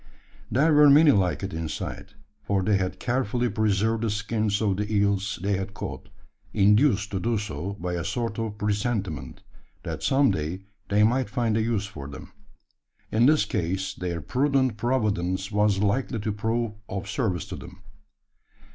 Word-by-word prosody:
There 150 +5 +3
were 150 0 +7
many 150 +2 +7
like 95 -5 +1
it 95 - -4
inside: 80 -1 -5 0.3
for 100 -2 0
they 100 +1 +3
had 95 -1 -3
carefully 125 -1 0
preserved 110 +1 +1
the 115 - 0
skins 105 0 -1
of 100 -4 +1
the 105 +1 -3
eels 100 -1 +1
they 100 0 +1
had 95 +1 -5
caught, - - -6 0.4
induced 105 +1 +3
to 95 - -1
do 115 +3 0
so 100 -2 -4
by 90 -3 -4
a 85 -1 -2
sort 115 +2 -3
of 110 -2 -3
presentiment, 100 - -2 0.4
that - - -5
some 135 0 +3
day 80 +5 -3 0.3
they 105 +1 +4
might 125 +2 +2
find 115 0 0
a 110 - +2
use 110 -2 0
for 80 -9 -8
them. 70 0 -10 0.8
In 115 +3 +4
this 150 -5 +4
case 95 0 -2
their 85 -2 -4
prudent 130 - +1
providence 105 -5 -1
was 105 -1 +2
likely 110 +5 0
to 110 - -1
prove 110 +2 -1 0.2
of 95 0 -4
service 100 - -1
to - - -5
them. 100 +2 -12
105 Hz, 165 wpm, -26 LUFS, 95-115 Hz, 0.8 s, were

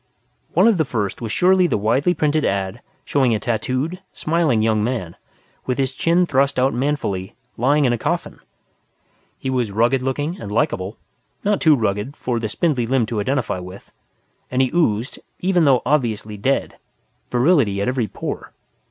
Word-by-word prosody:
One 185 +6 +6
of 215 -6 +3
the - - +4
first 110 -8 -3
was 115 -2 -4
surely 185 +3 +4
the 135 - 0
widely 130 - +1
printed 155 0 +1
one 95 -1 -1 0.2
showing 130 -5 +2
a - - -1
tattooed, 130 - -2
smiling 155 -9 +1
young 110 -1 +2
man 110 -8 -3 0.5
with 125 - 0
his 135 -1 0
chin 170 +6 +2
thrust 140 -3 +1
out 130 +2 +2
manfully, 120 -9 -2 0.2
lying 140 +5 +2
in 120 - +3
a 120 - -2
coffin. - - -2 1.0
He 130 - -3
was 125 -5 0
rugged 120 +5 +2
looking 145 +7 -2
and 100 - -6
likable 105 -5 -1 0.5
(not 205 -1 +1
too 155 -2 +6
rugged 110 +3 -2
for 120 -2 -2
the 110 -2 -3
spindly 130 -2 0
limbed 125 -3 +1
to 115 - -2
identify 130 -5 -1
with) 90 +2 -11 0.6
and 130 +1 +2
he 130 - -1
oozed, 125 -8 0 0.2
even 180 -3 +2
though 130 -4 +4
obviously 110 -7 0
dead, 130 +7 -1 0.5
virility 125 - +3
at 100 - -1
every 125 -3 0
pore. - - -6
130 Hz, 170 wpm, -21 LUFS, 110-150 Hz, 1.0 s, One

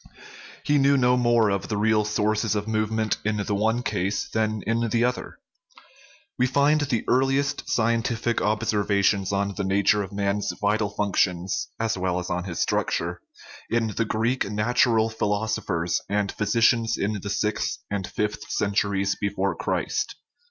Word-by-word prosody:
He 145 0 +2
knew 140 +1 +4
no 125 -1 +4
more 120 -3 +3
of 100 -1 -2
the 105 - -2
real 105 0 +3
sources 105 0 0
of 105 +1 -2
movement 110 0 0
in 110 0 0
the 105 0 -2
one 110 +4 +1
case 95 0 -1
than 110 -1 -1
in 115 +1 0
the 115 +2 +1
other. 125 -1 -3 1.0
We 125 - +4
find 145 +3 +3
the 125 -6 -1
earliest 135 +3 +1
scientific 115 -2 0
observations 105 -2 +1
on 100 0 0
the 100 - -3
nature 100 +2 +2
of 95 -1 -6
man's 100 0 -1
vital 105 0 +1
functions 95 -3 0
(as 110 -4 -1
well 90 -1 0
as 90 0 -4
on 90 +1 -2
his 85 -3 -1
struct - - 0
ure) 85 +1 -5 0.5
in 115 -1 +1
the 115 - 0
Greek 115 +1 0
natural 110 +1 +2
philosophers 105 -6 -1
and 105 -1 0
physicians 115 +2 +2
of 105 0 -2
the 100 - -5
sixth 105 +1 -1
and 100 -3 -2
fifth 105 0 -3
centuries 100 -1 0
before 100 -1 -1
Christ. - - -2
105 Hz, 155 wpm, -25 LUFS, 100-115 Hz, 1.0 s, knew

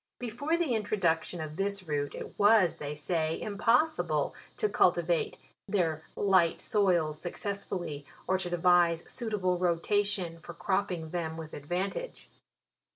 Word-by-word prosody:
Before 250 +8 -1
the 330 -7 +1
introduction 190 -6 0
of 155 0 -6
this 200 0 -1
root, 145 -4 -2
it - - -8
was, 205 -4 +5
they 145 0 -5
say, 155 +2 -1
impossible 230 +9 +1 0.2
to 430 - +2
cultivate 445 +1 +2 0.3
their 165 -6 0
light 185 -4 +3
soils 175 -7 +1
suc 175 - -4
cessfully, 185 -7 -4 0.2
or 190 0 +2
to 180 - -3
devise 175 -1 +4
suitable 200 -7 -1
rotation 180 0 0
for 170 +1 -10
cropping 175 -2 -1
them 165 -2 -3
with 160 -1 -8
advantage. 180 - -4
180 Hz, 130 wpm, -30 LUFS, 165-205 Hz, 0.3 s, was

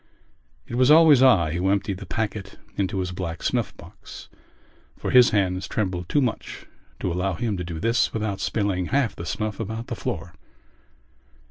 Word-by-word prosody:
It - - -10
was 125 +2 +3
always 155 -4 +7
I 95 -12 +5
who 90 +3 0
emptied 100 -1 0
the 100 - -9
packet 105 -1 -4 0.2
into 95 0 -1
his 90 -1 -3
black 90 -2 -5
snuff - - -1
box - - -12 0.7
for - - -3
his 125 -1 +7
hands 95 -2 0
trembled 90 -4 -2
too 145 - +2
much 125 -4 -3 0.4
to 90 - -1
allow 90 +1 -1
him 110 +2 -2
to 90 - -3
do 85 -2 -6
this 115 +5 +1
without 105 -3 -3
spilling 100 -5 -1
half 135 -4 0
the 85 - -7
snuff 105 +3 -3
about 110 +1 -4
the - - -3
floor. - - -5
100 Hz, 170 wpm, -24 LUFS, 90-115 Hz, 0.7 s, always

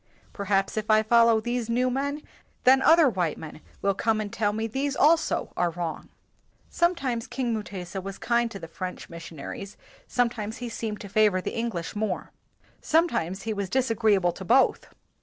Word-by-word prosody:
Perhaps 195 0 0
if 215 0 -2
I 215 0 +5
follow 230 0 +5
these 240 0 -3
new 250 +2 +1
men, 285 +3 -2 0.4
then 265 +1 +6
other 325 +1 +6
white 180 - -1
men 155 0 -9 0.2
will 200 - +3
come 220 +2 0
and 210 -1 -4
tell 205 -1 +1
me 220 +2 -2
these 270 +5 -2
also 320 +3 +2
are 175 - +1
wrong." 170 -1 -5 0.6
Sometimes 270 -9 0
King 245 -3 -2
Mu 220 - -1
tesa 190 -2 -6
was 195 +1 -7
kind 235 0 +1
to 205 - -7
the 165 -4 -8
French 180 +2 -7
missionaries: 170 +4 -8 0.3
sometimes 230 -3 -1
he 245 -1 -5
seemed 220 -2 -4
to 200 - -7
favor 205 -1 +3
the - - -4
English 225 -8 -3
more. 205 -3 -2 0.5
Sometimes 200 - +1
he 220 - -2
was 200 -2 -3
disagreeable 220 -8 +2
to 190 - -9
both. 250 +8 +3
220 Hz, 175 wpm, -26 LUFS, 195-245 Hz, 0.6 s, then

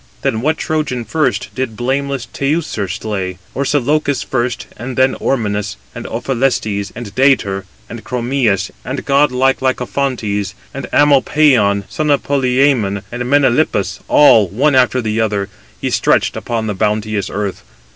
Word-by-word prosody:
Then 120 -5 0
what 155 +4 +1
Trojan 145 -6 -2
first 130 -1 -1
did 130 -5 -3
blameless 135 +1 -1
Teucer 140 - -2
slay? 95 -1 -4 0.2
Orsilochus 145 +1 +1
first, 120 -2 -2
and 125 +3 -6
Ormenus, 110 -6 0 0.2
and - - -7
Ophelestes, 115 -6 -1
and 110 -3 -7
Dætor, 110 -8 +2 0.2
and 120 -1 -9
Chromius, 120 -5 0
and - - -5
godlike 135 -2 +3
Lycophontes, 125 -5 -1 0.2
and - - -5
Amopaon, 135 -7 +4
son 155 -1 -2
of 140 -1 +2
Polyæmon, 130 -7 +1
and 120 0 -3
Melanippus—all, 130 -4 +3
one 135 - +1
after 130 0 +3
the 110 0 0
other, 105 -2 -1 0.3
he - - -2
stretched - - +2
upon 115 -2 -3
the 105 - -2
bounteous 105 0 -1
earth. 100 -1 -3
125 Hz, 125 wpm, -16 LUFS, 105-140 Hz, 0.3 s, Amopaon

